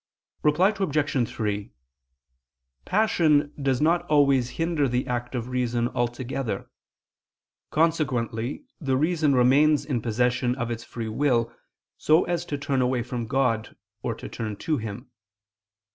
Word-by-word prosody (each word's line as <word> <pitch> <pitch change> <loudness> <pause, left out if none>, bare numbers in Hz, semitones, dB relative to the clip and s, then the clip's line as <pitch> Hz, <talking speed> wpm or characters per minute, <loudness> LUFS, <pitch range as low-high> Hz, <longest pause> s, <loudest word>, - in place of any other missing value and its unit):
Reply 155 +6 +4
Obj. 150 - 0
3: 105 -2 -3 1.1
Passion 160 -8 +2
does 135 -2 +1
not 165 +3 +3
always 140 -4 +3
hinder 165 -4 +1
the 125 +1 0
act 120 +1 -3
of 120 0 -3
reason 120 -1 0
altogether: 120 0 -3 1.0
consequently 135 - 0
the 135 -6 0
reason 155 -1 +2
remains 140 +4 +4
in 130 -6 -1
possession 125 +2 +1
of 120 -2 -3
its 115 -1 -4
free 115 -2 -6
will, 120 -1 +1 0.5
so 155 +3 +4
as 175 0 -2
to 145 - -3
turn 140 -2 0
away 125 -1 +1
from 120 -2 -4
God, 125 -3 0 0.3
or - - -2
turn 110 -2 -5
to 155 +8 -1
Him. 115 +3 -7
130 Hz, 130 wpm, -25 LUFS, 120-150 Hz, 1.1 s, Reply